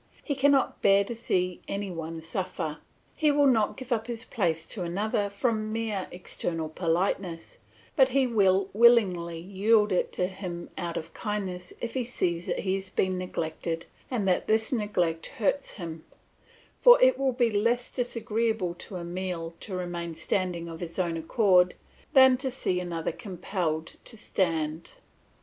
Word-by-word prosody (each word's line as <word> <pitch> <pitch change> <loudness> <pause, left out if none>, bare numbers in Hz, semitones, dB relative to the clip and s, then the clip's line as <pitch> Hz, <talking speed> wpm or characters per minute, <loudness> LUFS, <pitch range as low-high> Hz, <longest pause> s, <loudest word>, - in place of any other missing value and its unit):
He 290 - -1
cannot 275 0 +2
bear 195 0 +5
to 220 - -5
see 180 -6 -1
any 200 -1 -3
one 165 -1 -5
suffer; 165 -2 -3 0.3
he 305 - +2
will 290 0 +4
not 225 -6 +3
give 260 -1 -9
up 225 -1 0
his 235 0 -4
place 165 -7 -1
to 205 - -4
another 200 +4 -1
from 215 +1 -1
mere 215 -4 -2
external 165 -2 -4
politeness, 170 +1 -1 0.4
but 265 -3 +5
he 270 +1 +3
will 195 -5 +3
willingly 195 -7 +4
yield 205 +4 +2
it 185 - +1
to 180 - 0
him 180 -2 -6
out 170 -2 -3
of 160 0 -6
kindness 190 -4 -4
if 235 - -3
he 260 - 0
sees 175 -8 -1
that - - -1
he 190 -1 0
is 190 -1 -5
being 185 -1 0
neglected 165 -2 -3 0.2
and 225 -6 -1
that 180 - +1
this 220 0 +2
neglect 180 -8 0
hurts 230 +6 -1
him; 165 -5 -7 0.8
for - - +8
it - - +5
will 270 -1 +2
be 240 -2 +2
less 235 +4 +1
disagreeable 225 -5 -1
to 180 +2 -8
Emile 175 -1 -4
to 195 - -6
remain 175 -2 -4
standing 170 +1 -1
of 165 -1 -7
his 170 -2 -6
own 175 -3 0
accord 180 +1 +3 0.4
than 260 -1 +7
to 265 +1 -2
see 215 -8 -1
another 170 -2 -3
compelled 175 -4 -3
to 230 - -8
stand. 165 -6 -1
190 Hz, 160 wpm, -28 LUFS, 170-225 Hz, 0.8 s, for